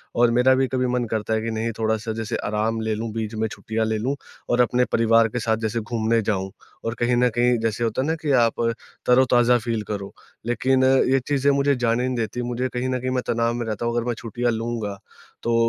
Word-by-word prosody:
और 120 0 +4
मेरा 125 +2 +4
भी 130 0 +2
कभी 130 -1 0
मन 125 -1 0
करता 110 0 -1
है 110 - +1
कि 115 +1 -3
नहीं 115 +1 -2
थोड़ा-सा 110 0 -1
जैसे 110 -1 -3
आराम 110 +2 -1
ले 110 -1 -1
लूँ, 110 +1 -4
बीच 110 0 -3
में 110 +1 0
छुट्टियाँ 110 +1 -3
ले 110 0 0
लूँ 130 +6 -1 0.3
और 120 0 +3
अपने 125 +1 +2
परिवार 115 0 +4
के 125 - -3
साथ 110 -1 0
जैसे 110 +1 -2
घूमने 115 +1 0
जाऊँ 95 -2 -2 0.3
और 115 - -1
कहीं 120 +1 +2
न 125 +1 +3
कहीं 120 0 +3
जैसे 115 +1 -1
होता 115 +2 0
है 135 - -1
ना 160 - +1
कि 150 -2 0
आप 120 -3 +3 0.4
तरोताज़ा 125 -1 +4
फील 115 -1 -2
करो, 100 -2 -5 0.3
लेकिन 130 +3 +2 0.3
ये 135 - +4
चीज़ें 140 -1 +2
मुझे 140 0 +2
जाने 120 -1 +1
नहीं 130 - -2
देती। 115 +1 -2
मुझे 125 +1 -2
कहीं 125 +1 -2
न 130 -1 -1
कहीं 130 +1 -2
मैं 125 -1 -1
तनाव 115 0 +1
में 120 -1 -3
रहता 110 +1 -3
हूँ 120 0 0
अगर 120 0 -1
मैं 120 - +1
छुट्टियाँ 120 +2 -2
लूँगा 115 -3 -3 0.5
तो 115 0 +1
115 Hz, 235 wpm, -23 LUFS, 110-125 Hz, 0.5 s, और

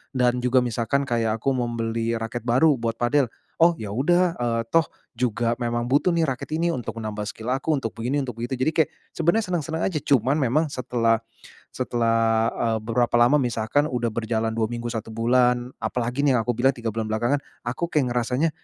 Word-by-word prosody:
Dan 125 -1 +2
juga 125 +1 +3
misalkan 120 +3 0
kayak 115 -4 -1
aku 135 - +2
membeli 115 -2 -1
raket 115 +2 -4
baru 130 +7 +4
buat 115 -1 -2
padel, 125 +2 +2 0.3
"Oh 170 0 +5
ya 105 -2 -6
udah, 175 +8 +2
eee, 115 -1 0
toh 165 -2 +3 0.2
juga 115 -1 0
memang 120 0 -1
butuh 140 +8 +2
nih 170 -2 +2
raket 135 -4 -4
ini 170 +1 +1
untuk 120 -3 -5
menambah 105 -1 -4
skill 115 +3 -3
aku 145 +3 0
untuk 115 -5 -4
begini, 130 +5 -1
untuk 125 - -5
begitu." 120 +2 -3
Jadi 130 +5 +1
kayak 160 - +2 0.2
sebenarnya 170 +7 +1
senang-senang 160 -1 -2
aja, 165 -6 -1
cuman 135 -2 +2
memang 140 +5 +2
setelah 120 -5 0 0.5
setelah, 115 -2 +1
eee, 115 -1 +1
beberapa 120 +1 +1
lama 125 +5 +5
misalkan 125 +2 +1
udah 120 -5 -1
berjalan 110 0 -1
2 110 - +2
minggu, 120 +1 -4
1 115 -1 -5
bulan 120 +1 +2
apalagi 125 +3 -2
nih 140 - +4
yang 120 - +3
aku 120 0 -2
bilang 135 +3 +3
3 120 -2 -4
bulan 110 +1 -3
belakangan 120 +6 +1 0.2
aku 125 +8 -2
kayak 150 -7 0
ngerasanya, 125 +6 +1
120 Hz, 190 wpm, -24 LUFS, 115-140 Hz, 0.5 s, Oh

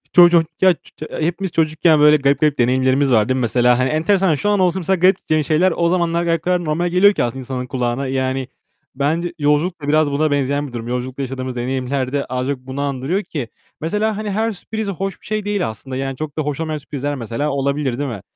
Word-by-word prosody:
Ço 175 -1 +9
ço 170 -1 +4 0.2
ya 185 -1 +6 0.4
hepimiz 175 +3 -2
çocukken 155 0 +3
böyle 150 0 +6
garip 140 0 +2
garip 150 -2 +2
deneyimlerimiz 130 +2 +2
var 110 +1 +3
değil 130 - +2
mi - - -1
mesela? 120 +1 +3
Hani 130 0 +1
enteresan, 165 +2 +2
şu 205 +8 -1
an 205 -2 +2
olsa 185 0 +2
mesela 190 +2 +1
garip 165 -4 +2
şeyler 170 +3 +2
o 170 0 +2
zamanlar 170 -1 +1 0.3
normal 170 +3 0
geliyor 195 +4 +5
ki - - 0
aslında 120 +2 -3
insanın 125 0 -4
kulağına. 125 +1 -2
Yani 130 0 -1 0.5
bence 165 +5 -1
yolculuk 150 +4 +1
da 145 - -6
biraz 155 -1 +3
buna 150 +1 +1
benzeyen 145 +1 0
bir 125 - -12
durum. 115 0 -5
Yolculukta 125 +2 -4
yaşadığımız 130 -1 -4
deneyimler 130 +2 -2
de 140 - 0
az 130 +1 -3
çok 140 -2 -2
bunu 130 +2 -6
andırıyor 140 +8 -1
ki. 135 -8 -5 0.3
Mesela 210 +6 -1
hani 215 -1 -3
her 220 +3 0
sürpriz 220 +2 -5
hoş 195 0 -4
bir - - -19
şey 215 -1 -2
değil 205 - -1
aslında. 130 +4 -8
Yani 135 0 -3
çok 155 -1 -6
da - - +1
hoş 145 0 -3
olmayan 155 -1 -2
sürprizler 145 0 -4
mesela 120 +4 -3
olabilir 140 -2 -1
değil 145 -2 -2
mi? 100 -5 -6
145 Hz, 215 wpm, -19 LUFS, 130-170 Hz, 0.5 s, Ço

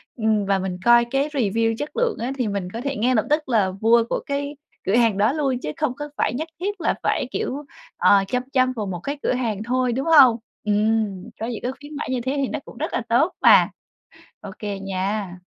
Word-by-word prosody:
ừm, 220 -3 +1
và 195 0 +1
mình 185 -1 -3
coi 240 0 +6
cái 270 +4 0
review 225 -5 0
chất 295 +5 -4
lượng 485 -2 +1
á, 240 +3 -2
thì 250 -4 0
mình 200 -3 -3
có 230 - -4
thể 275 +1 -3
ngay 250 +3 +1
lập 215 - +2
tức 300 -1 +1
là 210 -6 +2
mua 230 +1 +5
của - - 0
cái 285 +1 -3 0.3
cửa 195 - +2
hàng 230 -4 +3
đó 210 +4 +3
luôn 275 -5 0
chứ 150 - -4
không 300 -5 0
có 295 +2 -6
phải - - +1
nhất 310 +6 -3
thiết 395 +1 -3
là - - +1
phải, - - +1
kiểu, 285 +3 -3 0.3
ờ, 200 -1 +5
chăm 250 +4 -1
chăm 255 -1 +3
vào 220 -4 -4
một 185 -3 -4
cái 280 +11 -4
cửa - - +1
hàng 225 -5 -2
thôi, 250 +1 0
đúng 265 +3 -2
hông? 280 -8 +7 0.3
Ừm, 210 -1 0
có 225 - -2
những 235 -3 -5
cái 250 - -1
khuyến 290 +1 -10
mãi 290 - -4
như 255 -2 -1
thế 260 +3 -2
thì 275 -2 0
nó 305 - -3
cũng - - -13
rất - - -3
là - - 0
tốt 275 +10 +3
mà. - - +7 0.7
Ô - - -8
kê 205 -2 -4
nha. 195 0 -3
235 Hz, 240 wpm, -22 LUFS, 210-275 Hz, 0.7 s, hông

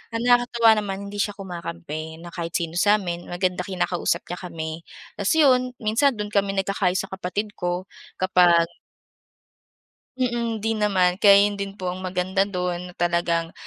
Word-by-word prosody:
Ang 230 - -1
nakakatuwa 245 -2 +4
naman 195 -2 -4
hindi 205 - -6
siya 205 0 0
kumakampi 170 -4 -6
na 175 - -9
kahit 170 -1 -5
sino 170 0 -1
sa 205 +2 +5
amin. 175 -4 -4
Maganda 180 +2 -2
kinakausap 180 -2 -1
niya 175 - -4
kami. 160 -2 -5 0.5
Ta's 200 +8 +2
'yon 255 -5 +4
minsan 235 +5 +2
do'n 210 0 -5
kami 200 -1 +1
nagkakaayos 195 -1 0
sa 195 - -10
kapatid 195 +3 -3
ko 180 -1 -3 0.3
kapag 180 -2 +4 1.5
Mm. 235 -3 -1
'Di 225 +2 -1
naman, 190 -3 +1
kaya 200 0 +7
'yon 205 - -1
din 195 +1 -5
po 180 -1 -3
ang 185 - -8
maganda 185 +1 -1
do'n 180 -2 -2
na - - -12
talagang, 170 -1 0
190 Hz, 165 wpm, -24 LUFS, 175-210 Hz, 1.5 s, kaya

